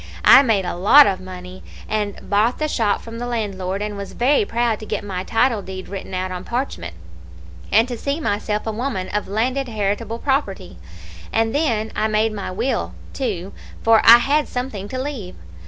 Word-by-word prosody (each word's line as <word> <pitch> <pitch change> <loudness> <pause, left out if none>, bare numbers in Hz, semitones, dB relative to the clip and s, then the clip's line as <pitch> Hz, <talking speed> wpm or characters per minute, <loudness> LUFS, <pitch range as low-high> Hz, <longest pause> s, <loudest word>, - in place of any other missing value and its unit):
I - - +9
made 220 -8 +1
a - - -2
lot 210 +11 +7
of 190 -2 0
money, 185 0 -10 0.3
and 210 -2 -2
I - - -13
bought 215 +4 +1
the 305 - -1
shop 225 -8 0
from 230 0 -8
the 245 - -4
landlord, 200 -4 -3
and 210 0 -4
was 200 0 -7
very 285 - +2
proud 235 - 0
to 215 - -9
get 210 - -3
my 185 -3 -4
title 225 +1 +1
deed 185 -1 -8
written 195 -1 -6
out 185 0 -2
on 180 0 -5
parchment, 235 - -4 0.8
and 225 +4 +4
to 245 - -4
see 280 +6 -3
myself 210 -5 -2
a 220 - -1
woman 215 -5 -3
of 210 - -2
landed 255 +6 -1
heritable 215 +1 -2
property; 235 -9 -2 0.5
and 225 0 +1
then 230 -8 0
I 215 - +1
made 215 0 +1
my 200 -2 -5
will, 225 +8 -2 0.2
too, 200 -8 -3 0.3
for 225 -1 +5
I 230 +1 +10
had 285 +5 +1
something 245 -6 -4
to 255 +5 -5
leave. 260 -10 -5
215 Hz, 190 wpm, -21 LUFS, 195-245 Hz, 0.8 s, I